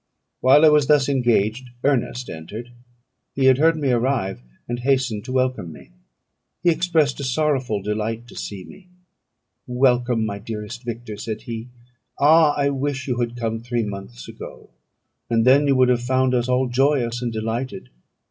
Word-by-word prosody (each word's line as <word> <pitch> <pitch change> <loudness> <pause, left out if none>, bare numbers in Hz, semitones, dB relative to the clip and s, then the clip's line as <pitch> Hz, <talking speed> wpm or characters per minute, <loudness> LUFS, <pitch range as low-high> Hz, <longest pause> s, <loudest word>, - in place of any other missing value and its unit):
While 140 +5 +6
I - - +8
was 150 -2 +3
thus 145 -3 +4
engaged, 120 -2 +1
Ernest 130 -2 0
entered: 105 +10 -8 0.6
he 135 - +1
had 130 0 +5
heard 165 +1 +4
me 140 -4 0
arrive, 120 - 0 0.3
and 120 0 -3
hastened 125 -5 0
to - - -6
welcome 130 -9 -1
me. 75 - -14 0.7
He 175 - +5
expressed 160 -4 +1
a - - -4
sorrowful 130 -6 0
delight 110 +3 -3
to - - -13
see 100 -3 -6
me: 185 - -15 0.8
"Welcome, 125 -2 +2
my 100 -1 -4
dearest 110 +3 -7
Victor," 115 -2 -6
said 110 +1 -5
he. 115 0 -6 0.5
"Ah! 155 +1 +5
I 140 -1 +2
wish 135 -1 -3
you 125 -2 -1
had 120 0 -2
come 115 -1 -2
three 120 0 -2
months 100 - -8
ago, - - -11 0.6
and 115 -1 +2
then 140 +3 +5
you 140 - +3
would 130 -1 +4
have 120 -1 +2
found 130 +1 +1
us 125 0 0
all 130 +1 +2
joyous 125 -2 +1
and 120 -1 -2
delighted. 115 - -4
125 Hz, 165 wpm, -22 LUFS, 115-135 Hz, 0.8 s, I